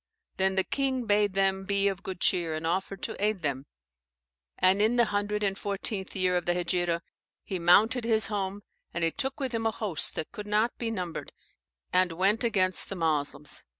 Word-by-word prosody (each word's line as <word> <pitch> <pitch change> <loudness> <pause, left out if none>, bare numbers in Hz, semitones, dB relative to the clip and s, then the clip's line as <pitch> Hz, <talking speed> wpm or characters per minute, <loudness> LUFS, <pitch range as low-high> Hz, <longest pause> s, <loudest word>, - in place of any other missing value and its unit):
Then 190 0 +2
the 190 - +3
king 265 -1 -1
bade 205 -2 +2
them 195 0 +1
be 200 0 +1
of 195 -1 -2
good 190 -2 -6
cheer, 170 -5 +1
and 155 +1 -4
offered 190 +3 -2
to - - -4
aid 210 -4 0
them. 140 -1 -2 0.9
And 190 +2 +3
in 220 +3 +3
the 240 - +5
114th 205 -1 -2
year 185 -1 +1
[Of 175 -1 -1
the 175 - +2
Hegira.] 175 -1 0 0.4
he 190 - -4
mounted 215 +8 +4
his 220 -1 +4
home, 200 -1 -3 0.3
and 170 - -1
he 165 - +2
took 270 - -2
with 265 -3 -2
him 225 -1 -1
a - - +3
host 200 -8 +1
that 155 - -4
could 210 0 -8
not 215 +3 +1
be 235 - -2
numbered, 180 -7 -5 0.6
and 180 -2 +3
went 195 +7 +2
against 185 -5 +2
the 200 - -4
Moslems. 150 -4 -1
195 Hz, 185 wpm, -28 LUFS, 180-210 Hz, 0.9 s, the